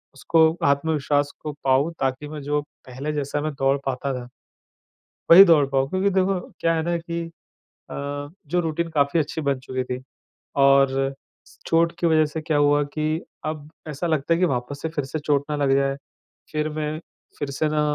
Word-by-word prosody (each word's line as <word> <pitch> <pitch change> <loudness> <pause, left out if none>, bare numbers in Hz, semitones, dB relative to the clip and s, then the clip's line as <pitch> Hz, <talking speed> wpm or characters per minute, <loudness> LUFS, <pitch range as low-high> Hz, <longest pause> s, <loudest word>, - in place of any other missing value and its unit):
उसको 165 +4 +1 0.3
आत्मविश्वास 145 0 +1
को 150 - -4
पाऊँ, 135 +4 +3
ताकि 135 +2 -1
मैं, 150 0 -7
जो 145 +1 0 0.3
पहले 135 +4 -4
जैसा 145 0 -2
मैं 155 +1 -2
दौड़ 135 +1 +3
पाता 135 +1 -2
था, 125 -1 -6 1.0
वही 180 +4 +12
दौड़ 160 -5 +5
पाऊँ। 135 0 +1
क्योंकि 190 +3 +1
देखो, 190 0 +1 0.2
क्या 165 - +2
है 160 - 0
ना 170 +1 0
कि 170 0 -4 0.7
अ, 145 0 -5 0.2
जो 175 +5 +1
रूटीन 165 0 -2
काफ़ी 145 0 +2
अच्छी 155 +1 -2
बन 140 -2 0
चुकी 130 0 -3
थी, 125 0 -5 0.6
और 135 -1 +4 0.4
स - - -20
चोट 165 0 +3
की 170 - +1
वजह 160 -1 +4
से 155 +2 -5
क्या 155 -1 -1
हुआ 145 0 +4
कि 155 +1 -1 0.3
अब 155 -1 -5 0.2
ऐसा 150 +3 -3
लगता 155 -1 0
है - - 0
कि 180 - +4
वापस 135 0 -3
से 160 - -1
फिर 155 -3 -3
से 135 +4 -4
चोट 145 -2 +1
ना 150 - 0
लग 140 -2 +2
जाए। 135 0 +1 0.6
फिर 155 0 0
मैं, 155 0 -3 0.4
फिर 145 -2 -3
से 150 +3 0
ना 155 - +2
145 Hz, 190 wpm, -23 LUFS, 140-160 Hz, 1.0 s, वही